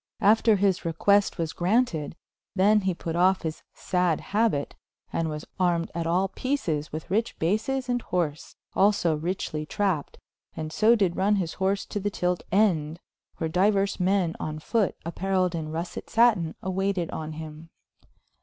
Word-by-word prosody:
After 220 Hz, +1 st, +5 dB
his 195 Hz, -2 st, +1 dB
request 200 Hz, +5 st, +2 dB
was 165 Hz, -2 st, -2 dB
graunted, 180 Hz, -5 st, 0 dB, 0.4 s
then 205 Hz, +3 st, +4 dB
he 190 Hz, -2 st, 0 dB
put 165 Hz, -1 st, -4 dB
off 185 Hz, +2 st, +3 dB
hys 160 Hz, -1 st, -4 dB
sayd 180 Hz, -3 st, 0 dB
habyte 205 Hz, -9 st, +1 dB, 0.4 s
and 165 Hz, -1 st, 0 dB
was 150 Hz, 0 st, -5 dB
armed 175 Hz, -2 st, +1 dB
at 170 Hz, -1 st, -2 dB
all 185 Hz, +3 st, +1 dB
peces 175 Hz, -, -2 dB
with 155 Hz, +1 st, -6 dB
ryche 225 Hz, +4 st, 0 dB
bases 220 Hz, +10 st, 0 dB
& -, -, -13 dB
horse, 160 Hz, -5 st, -2 dB, 0.2 s
also 195 Hz, -5 st, +3 dB
rychely 155 Hz, -1 st, -3 dB
trapped, 190 Hz, -8 st, -1 dB, 0.4 s
and 155 Hz, 0 st, -5 dB
so 220 Hz, +5 st, +5 dB
did 195 Hz, -6 st, +1 dB
runne 205 Hz, +2 st, +3 dB
his 180 Hz, -5 st, -2 dB
horse 195 Hz, +1 st, +1 dB
to 205 Hz, -, -4 dB
the 205 Hz, +1 st, -1 dB
tylte 180 Hz, -2 st, -1 dB
end, 170 Hz, -6 st, +2 dB, 0.4 s
where 160 Hz, -, -1 dB
dieurs 195 Hz, +4 st, +2 dB
men 180 Hz, -2 st, +1 dB
on 155 Hz, 0 st, -4 dB
fote 205 Hz, +5 st, 0 dB
appareiled 185 Hz, +1 st, 0 dB
in 160 Hz, -2 st, -4 dB
Russet 165 Hz, +2 st, -5 dB
satyn 225 Hz, -9 st, +3 dB
awaited 190 Hz, -2 st, -1 dB
on 155 Hz, 0 st, -5 dB
him. 155 Hz, +1 st, -9 dB
180 Hz, 155 wpm, -26 LUFS, 160-200 Hz, 0.4 s, After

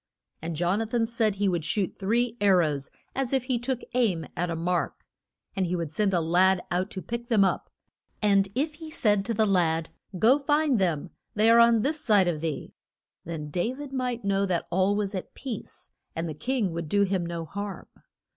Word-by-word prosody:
And 165 Hz, +1 st, -4 dB
Jon 175 Hz, +6 st, +1 dB
a 225 Hz, -, -2 dB
than 230 Hz, 0 st, +1 dB
said 225 Hz, -3 st, 0 dB
he 200 Hz, 0 st, +1 dB
would 175 Hz, -4 st, 0 dB
shoot 195 Hz, +3 st, -1 dB
three 230 Hz, +4 st, +1 dB
ar 195 Hz, -2 st, +5 dB
rows 150 Hz, -5 st, 0 dB, 0.2 s
as 270 Hz, -1 st, -2 dB
if 265 Hz, -2 st, +2 dB
he 255 Hz, -2 st, -1 dB
took 245 Hz, +1 st, -2 dB
aim 215 Hz, -10 st, +1 dB
at 175 Hz, 0 st, -1 dB
a 165 Hz, -, -2 dB
mark. 175 Hz, +2 st, -2 dB, 0.5 s
And 190 Hz, -2 st, 0 dB
he 180 Hz, -, -1 dB
would 165 Hz, -4 st, -3 dB
send 200 Hz, +4 st, +1 dB
a 180 Hz, -, +2 dB
lad 180 Hz, +3 st, +3 dB
out 180 Hz, +3 st, 0 dB
to 190 Hz, -4 st, -6 dB
pick 235 Hz, 0 st, -5 dB
them 215 Hz, -5 st, +4 dB
up. -, -, -1 dB, 0.5 s
And 200 Hz, -2 st, +3 dB
if 300 Hz, +4 st, 0 dB
he 315 Hz, +1 st, -10 dB
said 210 Hz, -9 st, +2 dB
to 230 Hz, -, -1 dB
the 220 Hz, +1 st, +3 dB
lad, 165 Hz, -5 st, +1 dB, 0.3 s
Go, 245 Hz, +9 st, +5 dB
find 290 Hz, -3 st, +2 dB
them, 170 Hz, -6 st, 0 dB, 0.2 s
they 215 Hz, +2 st, +5 dB
are 230 Hz, -, +7 dB
on 235 Hz, -2 st, +5 dB
this 300 Hz, +2 st, -1 dB
side 205 Hz, -4 st, +4 dB
of 160 Hz, -3 st, -1 dB
thee, 160 Hz, -2 st, -4 dB, 0.5 s
then 155 Hz, -3 st, -5 dB
Da 180 Hz, -, 0 dB
vid 285 Hz, -1 st, -8 dB
might 250 Hz, -4 st, -2 dB
know 200 Hz, 0 st, +1 dB
that 175 Hz, -3 st, -1 dB
all 190 Hz, +3 st, +2 dB
was 205 Hz, -1 st, -1 dB
at 185 Hz, -, -6 dB
peace 250 Hz, -6 st, -7 dB, 0.2 s
and 165 Hz, +1 st, -2 dB
the 155 Hz, -, -4 dB
king 220 Hz, -, -1 dB
would 165 Hz, -2 st, -4 dB
do 200 Hz, +3 st, +3 dB
him 190 Hz, -2 st, 0 dB
no 170 Hz, -1 st, -4 dB
harm. 200 Hz, +2 st, -6 dB
200 Hz, 210 wpm, -27 LUFS, 175-235 Hz, 0.5 s, are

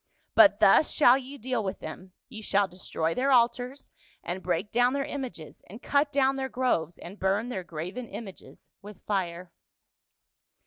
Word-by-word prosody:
But -, -, +6 dB
thus 310 Hz, -, +5 dB
shall 255 Hz, -4 st, +6 dB
ye 270 Hz, +1 st, -6 dB
deal 250 Hz, -2 st, -2 dB
with 190 Hz, -, -3 dB
them; 185 Hz, +4 st, -9 dB
ye 220 Hz, -4 st, -9 dB
shall 200 Hz, -1 st, +1 dB
destroy 165 Hz, -3 st, -3 dB
their 270 Hz, +6 st, 0 dB
altars, 245 Hz, +2 st, +1 dB, 0.3 s
and 180 Hz, +2 st, -4 dB
break 180 Hz, +3 st, -2 dB
down 245 Hz, +2 st, +3 dB
their 275 Hz, -1 st, -1 dB
images, 255 Hz, -, -7 dB
and 215 Hz, +5 st, -10 dB
cut 285 Hz, +2 st, +1 dB
down 270 Hz, -1 st, +2 dB
their 265 Hz, 0 st, -3 dB
groves, 175 Hz, -11 st, -1 dB
and 195 Hz, +4 st, -11 dB
burn 200 Hz, +5 st, 0 dB
their 190 Hz, -7 st, -4 dB
graven 180 Hz, +9 st, -6 dB
images 205 Hz, -5 st, -11 dB
with 205 Hz, -1 st, -13 dB
fire.' 180 Hz, -3 st, -3 dB
220 Hz, 165 wpm, -27 LUFS, 185-255 Hz, 0.3 s, But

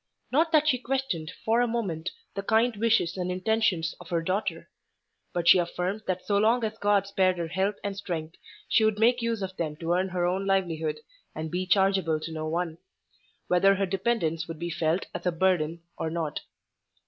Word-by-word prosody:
Not 320 Hz, +5 st, +3 dB
that 305 Hz, -2 st, +4 dB
she 255 Hz, -5 st, +3 dB
questioned, 250 Hz, -12 st, -2 dB
for 230 Hz, +2 st, +3 dB
a 245 Hz, -, +2 dB
moment, 190 Hz, -8 st, -2 dB, 0.2 s
the 200 Hz, -, -3 dB
kind 225 Hz, +3 st, +2 dB
wishes 210 Hz, -5 st, +2 dB
and 180 Hz, 0 st, -2 dB
intentions 185 Hz, -3 st, +1 dB
of 175 Hz, -, -12 dB
her 170 Hz, -1 st, 0 dB
daughter; 185 Hz, +5 st, -2 dB, 0.6 s
but 175 Hz, -1 st, -2 dB
she 185 Hz, -, +8 dB
affirmed 180 Hz, +4 st, -2 dB
that 185 Hz, -1 st, -2 dB
so 200 Hz, -1 st, +2 dB
long 230 Hz, +3 st, +3 dB
as 220 Hz, 0 st, -3 dB
God 205 Hz, -1 st, +3 dB
spared 190 Hz, -2 st, +2 dB
her 170 Hz, -1 st, -3 dB
health 190 Hz, +4 st, 0 dB
and 200 Hz, -1 st, -3 dB
strength, 170 Hz, -4 st, -5 dB, 0.3 s
she 220 Hz, -, +3 dB
would 220 Hz, -1 st, +2 dB
make 240 Hz, +3 st, +3 dB
use 230 Hz, -3 st, -1 dB
of 190 Hz, 0 st, -5 dB
them 155 Hz, -3 st, -2 dB
to 165 Hz, +2 st, -1 dB
earn 185 Hz, +2 st, +1 dB
her 180 Hz, -1 st, 0 dB
own 190 Hz, +2 st, 0 dB
livelihood, 165 Hz, -5 st, 0 dB, 0.3 s
and 155 Hz, 0 st, -4 dB
be 185 Hz, +1 st, -2 dB
chargeable 190 Hz, -4 st, +3 dB
to 165 Hz, -, -5 dB
no 155 Hz, -1 st, -4 dB
one; 165 Hz, 0 st, -2 dB, 0.7 s
whether 195 Hz, +2 st, +4 dB
her 195 Hz, +1 st, +1 dB
dependence 180 Hz, -5 st, -1 dB
would 165 Hz, -1 st, -6 dB
be 170 Hz, +1 st, -4 dB
felt 165 Hz, +3 st, 0 dB
as -, -, -4 dB
a -, -, +3 dB
burden 170 Hz, -2 st, +1 dB, 0.2 s
or 160 Hz, -, -1 dB
not. 160 Hz, -2 st, -3 dB
185 Hz, 195 wpm, -27 LUFS, 165-210 Hz, 0.7 s, she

